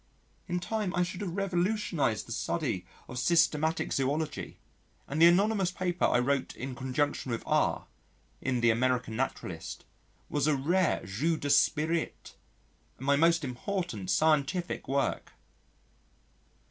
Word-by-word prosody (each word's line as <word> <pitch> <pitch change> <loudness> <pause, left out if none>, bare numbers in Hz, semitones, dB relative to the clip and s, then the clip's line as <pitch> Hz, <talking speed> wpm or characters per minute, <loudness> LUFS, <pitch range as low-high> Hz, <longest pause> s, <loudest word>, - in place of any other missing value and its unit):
In 180 -1 -1
time 200 +1 -2
I 180 - +3
should 180 +1 -5
have 180 -4 -4
revolutionised 180 - 0
the - - -11
study - - -2 0.2
of 125 - -5
Systematic 160 -1 +2
Zoology, 145 +3 -2 0.5
and 150 +3 -2
the 170 - +10
anonymous 195 +2 +3
paper 180 -1 -1
I - - +3
wrote 135 +2 0
in 130 +1 -5
conjunction 130 +1 -1
with 115 - -3
R - - +1 0.6
in 125 -3 0
the 120 -1 +5
American 125 -1 0
Naturalist 95 -9 -4 0.4
was 145 0 0
a 150 - +3
rare 170 +6 +1
jeu 140 - 0
d'esprit, 155 +3 +1 0.6
and 130 - -8
my 140 0 +4
most 165 +2 +3
important 130 - -3
scientific 155 - +1
work. 140 +1 -1
150 Hz, 130 wpm, -30 LUFS, 130-175 Hz, 0.6 s, the